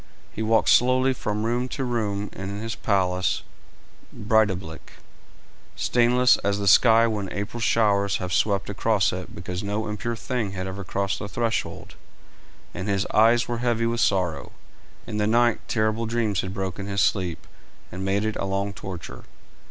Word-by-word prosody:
He - - -5
walked 110 0 +2
slowly 130 +1 +4
from 105 -3 -3
room 120 +2 0
to 135 - -3
room 105 -5 -2
in 100 +1 -6
his 115 +1 -4
palace 95 -4 0 0.7
Breidablik, 100 -6 -1 0.8
stainless 125 +1 +3
as 100 0 -1
the 100 -1 -2
sky 115 +4 +6
when 105 -4 -2
April 105 +4 -4
showers 100 -3 +2
have 90 -1 -4
swept 100 +1 +1
across 105 -1 +1
it 90 0 -7
because 90 +1 -5
no 105 +2 -2
impure 110 +3 -3
thing 115 -3 -3
had 95 -1 -4
ever 95 +1 -5
crossed 100 +1 -2
the 100 - -6
threshold, 115 +2 -3 0.8
and 95 - -5
his 100 0 0
eyes 115 +2 +4
were 120 -1 -3
heavy 120 -1 0
with 115 0 0
sorrow. 85 -9 0 0.5
In 105 - -5
the 105 0 +1
night 120 +1 +3
terrible 110 0 0
dreams 110 -4 0
had 95 - -5
broken 95 0 -4
his 100 -1 0
sleep, 90 -4 0 0.5
and 95 +1 -6
made 100 +2 0
it 110 - -2
a - - -2
long 100 +1 -2
torture. 95 -4 -8
105 Hz, 160 wpm, -24 LUFS, 95-115 Hz, 0.8 s, sky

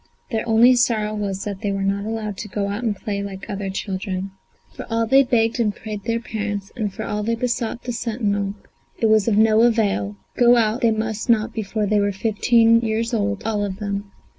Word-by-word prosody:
Their 225 0 -2
only 235 +3 +6
sorrow 220 -3 +1
was 200 -2 -3
that 200 -2 -5
they 205 - -1
were 195 0 -2
not 200 +1 -1
allowed 215 -2 -3
to 210 - -6
go 200 0 -2
out 205 +3 -3
and 220 -3 0
play 200 +1 -4
like 195 -1 -7
other 200 -1 -4
children. 190 0 -4 0.4
For - - -8
all 230 0 +1
they 265 +4 +6
begged 235 -3 +1
and 210 -3 +1
prayed 215 -2 -7
their 230 0 0
parents, 205 -4 -4
and 215 -5 -2
for 220 +3 -6
all 210 0 -2
they 230 +2 0
besought 240 0 -2
the 245 - -4
sentinel, 205 -4 -1 0.4
it - - 0
was 215 -1 +4
of 215 -3 +2
no 220 0 +5
avail; 205 - +2 0.2
go 240 0 +6
out 225 +1 +1
they 235 - +4
must 220 0 -2
not 230 0 +2
before 215 0 -2
they 210 +1 +2
were 205 0 +1
fifteen 230 +3 +3
years 230 +1 -1
old, 210 -2 -1
all 215 -2 0
of 195 -2 -3
them. 200 -1 -4
215 Hz, 215 wpm, -22 LUFS, 200-230 Hz, 0.4 s, only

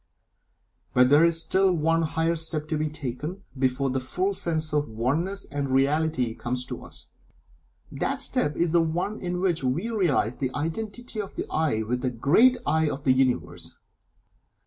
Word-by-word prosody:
But 125 0 +6
there 145 +3 +6
is 170 -1 +3
still 190 +4 +2
one 165 -1 +2
higher 165 +1 0
step 155 -1 -2
to 155 - 0
be 155 0 0
taken 150 +6 -5
before 130 0 0
the 130 - 0
full 185 +10 -1
sense 160 -4 -1
of 150 0 +1
the 110 - -12
Oneness 160 - -1
and 140 -1 -2
Reality 135 -2 +1
comes 125 +2 -2
to - - -6
us. - - -10 0.9
That - - -2
step 150 - 0
is 170 -1 +1
the 170 0 +4
one 175 +6 -2
in 180 -1 -2
which 175 -6 0
we 160 - -1
realize 160 - +1
the 130 - -1
Identity 215 - -4
of 195 - -9
the - - -3
"I" 150 -9 +1
with 125 +3 -2
the 130 - 0
great 170 - +4
"I" 160 +1 +2
of 140 0 -5
the 130 - +4
Universe. 85 -11 -1
155 Hz, 175 wpm, -26 LUFS, 130-170 Hz, 0.9 s, But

